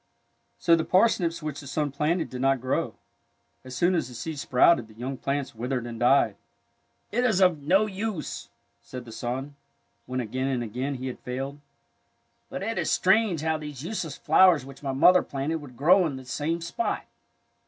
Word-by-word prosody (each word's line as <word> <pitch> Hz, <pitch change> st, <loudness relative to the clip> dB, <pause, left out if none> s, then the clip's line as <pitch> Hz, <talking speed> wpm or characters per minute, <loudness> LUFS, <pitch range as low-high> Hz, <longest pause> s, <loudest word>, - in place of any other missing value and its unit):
So 170 Hz, -, +4 dB
the 165 Hz, -, 0 dB
parsnips 180 Hz, -5 st, +2 dB
which 150 Hz, -2 st, -4 dB
the 140 Hz, -, -10 dB
son 145 Hz, +1 st, -1 dB
planted 155 Hz, +5 st, -1 dB
did 125 Hz, 0 st, -5 dB
not 135 Hz, 0 st, +3 dB
grow. 130 Hz, +2 st, -1 dB, 0.7 s
As 130 Hz, 0 st, -8 dB
soon 175 Hz, +1 st, +3 dB
as 165 Hz, -8 st, 0 dB
the 125 Hz, -, -11 dB
seeds 140 Hz, +5 st, -5 dB
sprouted 125 Hz, -1 st, +4 dB
the 110 Hz, -, -17 dB
young 130 Hz, +4 st, -4 dB
plants 140 Hz, +1 st, -3 dB
withered 125 Hz, +2 st, -3 dB
and 115 Hz, -1 st, -7 dB
died. 120 Hz, -5 st, +3 dB, 0.7 s
It 245 Hz, +3 st, +1 dB
is 220 Hz, -6 st, +2 dB
of 180 Hz, -6 st, +4 dB
no 190 Hz, +9 st, +3 dB
use," 200 Hz, -4 st, -4 dB, 0.3 s
said 120 Hz, +1 st, -9 dB
the 115 Hz, -, -10 dB
son, 130 Hz, +5 st, -4 dB, 0.5 s
when 130 Hz, 0 st, -2 dB
again 130 Hz, +3 st, -2 dB
and 130 Hz, -3 st, -1 dB
again 125 Hz, +5 st, -3 dB
he 130 Hz, 0 st, -6 dB
had 130 Hz, -, -5 dB
failed. 135 Hz, +3 st, -5 dB, 0.5 s
'' -, -, -45 dB
But -, -, -5 dB
it 225 Hz, +3 st, -2 dB
is -, -, -1 dB
strange 190 Hz, -4 st, +3 dB
how 160 Hz, 0 st, 0 dB
those 150 Hz, -3 st, -7 dB
useless 170 Hz, -5 st, -4 dB
flowers 180 Hz, -8 st, +5 dB
which 135 Hz, 0 st, -12 dB
my 140 Hz, -2 st, -2 dB
mother 175 Hz, +7 st, +6 dB
planted 140 Hz, +4 st, -3 dB
would 140 Hz, -6 st, -12 dB
grow 180 Hz, +8 st, +5 dB
on 155 Hz, -5 st, -2 dB
this 130 Hz, -1 st, -9 dB
same 165 Hz, +3 st, -1 dB
spot." 170 Hz, -, -2 dB
140 Hz, 190 wpm, -26 LUFS, 130-170 Hz, 0.7 s, mother